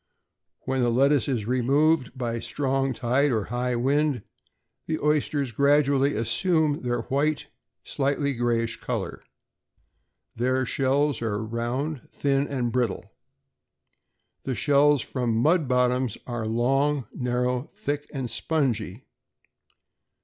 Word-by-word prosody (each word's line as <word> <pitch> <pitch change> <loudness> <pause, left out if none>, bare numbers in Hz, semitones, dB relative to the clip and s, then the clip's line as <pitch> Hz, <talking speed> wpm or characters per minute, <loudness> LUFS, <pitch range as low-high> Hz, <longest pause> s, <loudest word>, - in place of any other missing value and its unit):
When 130 0 -1
the 120 - +2
lettuce 135 +2 +3
is 120 -7 -1
removed 130 +4 +2
by 120 -2 -2
a 115 - -3
strong 135 -1 -1
tide 130 +4 +1
or 110 -3 0
high 125 0 0
wind, 140 0 +1 0.6
the 160 - -1
oysters 145 -3 0
gradually 140 +2 +3
assume 145 +7 +1
their 120 -1 -1
white, 145 +5 0 0.4
slightly 140 +1 -1
grayish 115 -1 -1
color. - - -4 1.1
Their 130 +2 +1
shells 135 +1 +1
are 110 -1 -2
round, 120 +6 -3
thin, 140 0 0
and 125 -4 -2
brittle. 120 -5 -1 1.3
The 130 - -3
shells 145 0 +3
from 120 -4 -2
mud 155 +5 +3
bottoms 125 -2 +1
are 120 -3 -3
long, 135 +4 +1
narrow, 125 +1 -1
thick, 145 -8 -4
and 135 -3 -3
spongy. 120 - -2
130 Hz, 115 wpm, -25 LUFS, 120-145 Hz, 1.3 s, lettuce